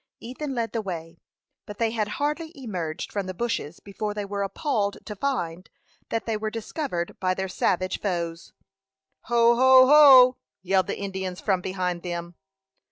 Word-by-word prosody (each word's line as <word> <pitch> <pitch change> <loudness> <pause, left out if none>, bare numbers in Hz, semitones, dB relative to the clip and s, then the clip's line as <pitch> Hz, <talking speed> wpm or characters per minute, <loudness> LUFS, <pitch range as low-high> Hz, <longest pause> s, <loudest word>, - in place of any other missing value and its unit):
Ethan 265 +3 -6
led 230 -1 -2
the 225 - -2
way, 165 -4 -7 0.5
but 205 - -8
they 225 -1 +1
had 220 -2 -1
hardly 300 +3 -2
emerged 185 - -5
from 200 -2 -3
the 185 - -5
bushes 225 -8 -3
before 205 +1 -5
they 205 -1 -3
were 200 0 -4
appalled 205 -1 -1
to 210 - -6
find 185 -8 -3 0.4
that 225 - -2
they 225 - -1
were 215 0 -2
discovered 225 - -4
by 185 -1 0
their 190 0 -3
savage 185 0 -1
foes. 170 -3 -3 0.7
"Ho, 235 0 +4
ho, 260 +1 +7
ho!" 265 -3 +8 0.3
yelled 190 0 +2
the - - -3
Indians 190 -2 -5
from 190 -3 0
behind 180 -2 -3
them. 175 -1 -5
205 Hz, 165 wpm, -25 LUFS, 185-235 Hz, 0.7 s, ho